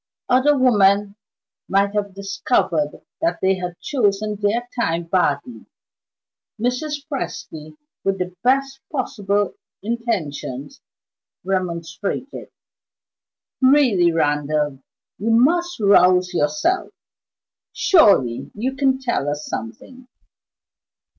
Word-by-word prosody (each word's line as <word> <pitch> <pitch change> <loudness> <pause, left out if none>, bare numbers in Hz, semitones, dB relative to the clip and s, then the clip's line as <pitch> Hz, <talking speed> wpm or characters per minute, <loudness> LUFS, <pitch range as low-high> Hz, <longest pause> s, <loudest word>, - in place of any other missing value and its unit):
Other 265 +3 +4
women 205 -5 +3 0.5
might 200 +1 +2
have 200 -2 -2
discovered 195 -6 -1 0.2
that 335 +1 +1
they 190 0 +2
had 175 -1 -6
chosen 210 -5 0
their 215 +4 0
time 170 -8 0
badly. 145 - -1 0.9
Mrs. 280 +5 -2
Presty, 155 - -6 0.3
with 195 0 0
the 180 -1 -4
best 270 +2 +1
possible 205 -7 -1 0.3
intentions, 160 - -4 0.6
remonstrated. 185 - -3 1.1
"Really, 255 -11 +4
Randal, 150 -2 0 0.4
you 215 +4 -1
must 340 +9 +2
rouse 185 -3 +4
yourself. 305 - 0 0.8
Surely 190 - +3
you 255 +6 -2
can 265 -1 +2
tell 240 - -1
us 150 +1 -4
something. 180 - -8
200 Hz, 90 wpm, -21 LUFS, 170-255 Hz, 1.1 s, Other